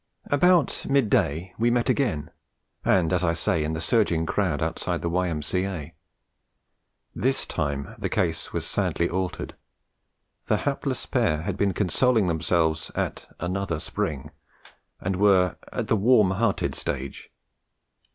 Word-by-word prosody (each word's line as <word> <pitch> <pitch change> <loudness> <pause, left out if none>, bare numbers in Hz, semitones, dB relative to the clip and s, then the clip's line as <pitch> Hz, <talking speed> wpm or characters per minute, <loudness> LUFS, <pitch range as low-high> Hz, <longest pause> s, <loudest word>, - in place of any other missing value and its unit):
About 175 +2 +3
mid 135 -6 +2
day 85 +6 +1
we 120 +1 +3
met 120 0 +1
again, 95 - 0 0.5
and 90 -3 +3
as 90 0 +1
I 85 -2 +2
say, 80 -1 0
in 75 +1 -2
the 80 - -3
surging 85 -3 +2
crowd 85 -4 0
outside - - -2
the 85 - 0
Y.M.C.A. 85 -1 -2 1.2
This 135 +2 0
time 70 -4 -3
the - - -2
case 80 -3 -1
was - - -3
sadly 85 - 0
altered; 90 0 -3 0.9
the - - +3
hapless - - -2
pair 75 0 +1
had 95 +1 -2
been 100 -1 0
consoling 110 +3 +2
themselves 80 -1 +1
at - - -3
another 90 -2 -2
spring, 70 -3 -3 0.7
and 95 0 -2
were 95 -3 +4 0.2
at - - -3
the - - +3
warm 105 -2 +4
hearted 100 +1 0
stage. 65 +1 -5
90 Hz, 135 wpm, -25 LUFS, 80-105 Hz, 1.2 s, were